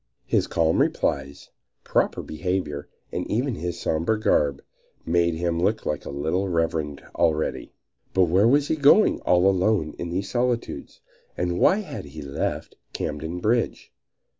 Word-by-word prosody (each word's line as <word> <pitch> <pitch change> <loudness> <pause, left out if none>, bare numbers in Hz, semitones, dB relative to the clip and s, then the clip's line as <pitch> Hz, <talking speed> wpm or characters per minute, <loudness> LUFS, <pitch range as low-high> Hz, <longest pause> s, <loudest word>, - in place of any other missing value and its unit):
His - - +1
calm 80 -1 +2
replies, 70 0 -1 0.3
proper - - 0
behavior, 80 -3 -3 0.2
and - - -4
even 125 +4 0
his 85 -2 -4
somber 85 +8 0
garb 70 -9 +1 0.4
made 85 0 +2
him 85 0 -1
look 105 +4 0
like 75 - -2
a - - -6
little 80 +8 -1
reverend 80 -4 -1
already. 80 -1 0 0.4
But 95 - +5
where 90 +5 +4
was 140 +3 +3
he - - +2
going 150 +9 +5
all 90 +1 +3
alone 95 -4 +2
in 85 - -4
these 95 +4 -2
solitudes 120 -1 -2 0.4
and 90 0 -1
why 200 +3 +4
had 190 - -7
he 75 +1 -9
left 70 0 -4 0.2
Camden 80 +4 -4
Bridge? 115 +4 0
85 Hz, 145 wpm, -24 LUFS, 80-105 Hz, 0.4 s, But